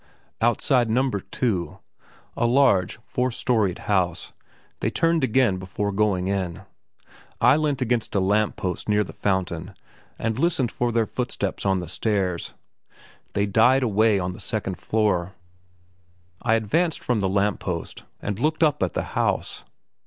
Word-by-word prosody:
Outside 120 +1 +2
No. 130 +4 +2
2, 100 -2 -2 0.6
a 120 - 0
large 120 -9 +3
four 125 +1 0
storeyed 110 -6 0
house, 90 -4 -1 0.5
they - - 0
turned 165 -2 +1
again 125 -5 +3
before 95 +3 -3
going 95 -2 +1
in. 95 -1 -2 0.8
I 130 - +6
leant 150 -4 0
against 120 -2 -1
a - - +4
lamp 105 +3 +1
post 90 +3 -4
near 105 0 +3
the - - -10
fountain 95 -4 -2 0.4
and 115 +1 -2
listened 140 -7 +1
for 120 -1 -1
their 115 -1 +2
footsteps 105 -5 -3
on 95 -1 +2
the 90 - -6
stairs. 95 -1 -1 0.8
They 100 - +1
died 120 +6 +4
away 110 -2 +3
on 90 -1 -2
the - - -11
second 100 -5 -3
floor. 100 -4 0 1.1
I 115 -1 +3
advanced 155 - 0
from 125 -3 +1
the 95 -2 0
lamp 100 +1 +1
post 85 -3 -5 0.2
and 100 0 -3
looked 155 +5 +1
up 150 -3 +2
at 95 - 0
the - - 0
house. - - -1
105 Hz, 150 wpm, -24 LUFS, 95-125 Hz, 1.1 s, I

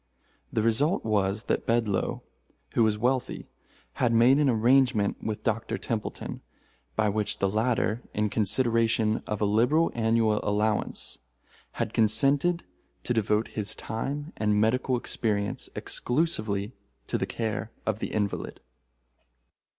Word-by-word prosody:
The 110 - 0
result 140 - +2
was 105 0 0
that - - -2
Bedloe, 115 -4 0 0.5
who - - +2
was 110 -2 +3
wealthy, 125 +3 -1 0.6
had 120 -2 +3
made 120 +5 +5
an 145 -2 +3
arrangement 120 -2 +2
with 110 -1 -4
Dr. 115 0 -1
Templeton, 110 -3 -4 0.5
by 110 0 +2
which 105 0 0
the 100 - +1
latter, 110 +2 0
in 105 -1 -1
consideration 115 0 +2
of 105 -1 -3
a - - +3
liberal 120 +11 +3
annual 110 -2 +2
allowance, 105 +1 -1 0.5
had - - -3
consented 140 - +3 0.4
to 120 - -1
devote 110 0 +1
his 105 -2 -2
time 145 +7 -4
and 105 -1 +1
medical 125 +4 +2
experience 105 -4 -2
exclusively 110 -8 -1 0.3
to - - -2
the - - -1
care 115 0 -3
of 110 -1 -1
the - - -2
invalid. 105 -2 -3
110 Hz, 125 wpm, -27 LUFS, 105-125 Hz, 0.6 s, made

